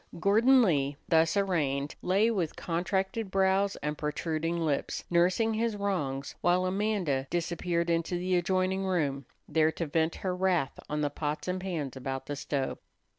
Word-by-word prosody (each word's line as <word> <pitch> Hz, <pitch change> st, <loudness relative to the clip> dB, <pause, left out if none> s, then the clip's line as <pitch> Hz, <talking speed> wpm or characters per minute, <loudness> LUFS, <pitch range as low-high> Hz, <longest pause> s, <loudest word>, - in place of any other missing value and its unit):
Gordon 235 Hz, +8 st, +5 dB
Lee, 140 Hz, -7 st, +1 dB
thus 165 Hz, +3 st, +3 dB
arraigned, 150 Hz, -8 st, 0 dB
lay 200 Hz, +5 st, +3 dB
with 180 Hz, -8 st, -1 dB
contracted 190 Hz, +4 st, -1 dB
brows 195 Hz, +1 st, +2 dB
and 150 Hz, +1 st, -1 dB
protruding 160 Hz, +2 st, -2 dB
lips, 145 Hz, -3 st, -1 dB
nursing 185 Hz, +6 st, +3 dB
his 225 Hz, 0 st, 0 dB
wrongs, 150 Hz, -10 st, -2 dB
while 180 Hz, +1 st, +3 dB
Amanda 185 Hz, -8 st, 0 dB
disappeared 170 Hz, 0 st, -1 dB
into 165 Hz, +1 st, 0 dB
the 180 Hz, +1 st, 0 dB
adjoining 185 Hz, +2 st, +1 dB
room, 145 Hz, -8 st, -1 dB, 0.2 s
there 155 Hz, +1 st, +3 dB
to 170 Hz, -, -3 dB
vent 160 Hz, +2 st, 0 dB
her 185 Hz, -2 st, -2 dB
wrath 180 Hz, -6 st, 0 dB
on 150 Hz, 0 st, -1 dB
the 145 Hz, -1 st, 0 dB
pots 150 Hz, +2 st, -3 dB
and 180 Hz, 0 st, -2 dB
pans 160 Hz, -8 st, -3 dB
about 135 Hz, 0 st, -4 dB
the 145 Hz, -, -4 dB
stove. 140 Hz, -1 st, -2 dB
175 Hz, 155 wpm, -29 LUFS, 150-190 Hz, 0.2 s, Gordon